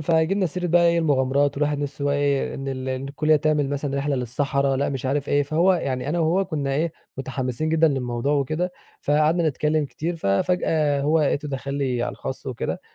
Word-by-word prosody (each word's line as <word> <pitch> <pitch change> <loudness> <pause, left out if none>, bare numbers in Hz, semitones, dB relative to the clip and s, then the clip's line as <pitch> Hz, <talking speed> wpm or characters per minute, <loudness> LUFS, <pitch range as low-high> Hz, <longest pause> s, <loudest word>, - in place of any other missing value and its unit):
فجبنا 165 +5 +2
سيرة 180 +2 -3
بقى 170 0 +4
إيه 170 0 +3
المغامرات 140 -2 +2
والواحد 150 0 0
نفسه 145 0 -4
بقى 140 0 +2
إيه، 145 -1 0
إن 135 0 -5
ال 130 -1 -4
إن 130 +1 -3
الكلية 155 +2 +2
تعمل 150 -2 +1
مثلًا 140 -1 -2
رحلة 140 0 0
للصحراء 135 +2 0
لأ 140 - 0
مش 135 -2 -3
عارف 140 +1 -1
إيه، 145 - +3
فهو 160 +6 +3
يعني 135 -5 -2
أنا 170 +3 0
وهو 170 +4 +2
كنّا 140 -6 -2
إيه 160 +2 0 0.3
متحمسين 135 +2 -2
جدًا 160 0 +4
للموضوع 125 -1 -1
وكده، 155 +5 0 0.3
فقعدنا 155 +3 +2
نتكلّم 150 +2 0
كتير 165 +4 -4
ففجأة 150 - +1
هو 155 +3 +2
لقيته 150 0 0
دخل 140 0 -4
لي 130 -4 -1
على - - -2
الخاص 135 +2 -6
وكده، 125 -3 -3
145 Hz, 195 wpm, -23 LUFS, 135-155 Hz, 0.3 s, بقى